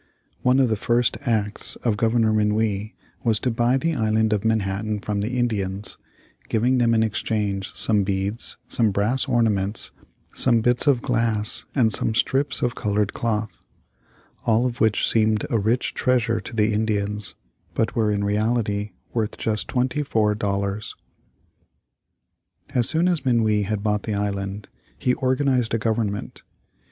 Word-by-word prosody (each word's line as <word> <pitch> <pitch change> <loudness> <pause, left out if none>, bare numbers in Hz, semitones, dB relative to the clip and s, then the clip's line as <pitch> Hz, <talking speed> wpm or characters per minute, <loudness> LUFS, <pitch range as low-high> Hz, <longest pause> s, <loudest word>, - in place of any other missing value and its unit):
One 125 +1 +3
of 130 -3 +3
the 110 - +1
first 120 +3 +1
acts 105 -3 0
of 115 -3 +1
Governor 115 0 +2
Minuit 105 -1 0 0.3
was 110 -3 +2
to 125 - 0
buy 120 +3 +2
the 165 +5 0
Island 110 -3 +1
of 105 - -1
Manhattan 105 -1 -1
from 105 0 -2
the 120 +5 -2
Indians, 100 -5 -2 0.5
giving 125 +3 +2
them 115 -1 +3
in 110 - +3
exchange 105 -3 -2
some 105 -3 +3
beads, 100 +3 -1
some 115 -3 +2
brass 105 +8 0
ornaments, 110 -5 0 0.4
some 120 -3 +5
bits 120 +4 +2
of 135 -3 +3
glass 115 -4 0
and 115 -6 +3
some 110 - +1
strips 135 +3 0
of 120 - +1
colored 105 -2 -1
cloth; 110 -2 -3 0.8
all 115 +2 +2
of 120 -1 -3
which 110 -1 +2
seemed 110 -1 +2
a 115 - +2
rich 115 +5 0
treasure 115 -3 +1
to 110 +3 -9
the 110 0 +2
Indians, 105 -2 -1 0.4
but 110 - 0
were 110 -2 +2
in 100 -1 0
reality 105 0 0 0.2
worth 110 -2 -2
just 110 -2 -2
twenty 130 +4 0
four 110 -7 +1
dollars. 100 0 -3 1.8
As 125 -4 +5
soon 165 +2 +2
as 175 -4 0
Minuit 110 -5 +2
had 105 -1 -2
bought 105 -1 0
the 105 0 -3
island, 100 0 -3 0.3
he 125 - +1
organized 130 -3 +1
a - - +2
government. 110 -2 -2
110 Hz, 150 wpm, -23 LUFS, 105-120 Hz, 1.8 s, some